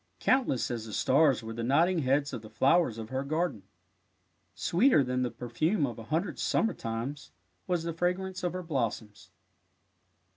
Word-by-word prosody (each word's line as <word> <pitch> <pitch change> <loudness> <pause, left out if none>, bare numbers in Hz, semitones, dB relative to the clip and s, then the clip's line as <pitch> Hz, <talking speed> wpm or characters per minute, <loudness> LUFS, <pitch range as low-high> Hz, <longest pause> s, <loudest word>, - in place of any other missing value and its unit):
Countless 255 - +1
as 115 -2 -4
the 110 - -8
stars 140 0 +3
were 110 0 -6
the 115 - -5
nodding 165 +8 +3
heads 140 0 +1
of 120 - -4
the 110 - -12
flowers 140 -3 +2
of 110 -1 -7
her 130 +1 -2
garden. 155 - -1 0.9
Sweeter 180 - +3
than 125 0 -1
the 125 - 0
perfume 140 - -1
of 120 -4 -6
a 115 - -9
hundred 165 - -2
sum - - +1
mer 225 - 0
times 115 - -5 0.4
was 175 -2 0
the 165 0 -3
fragrance 180 +3 -2
of 175 - -1
her 185 0 -4
blossoms. 115 -9 -3
140 Hz, 175 wpm, -29 LUFS, 120-175 Hz, 0.9 s, stars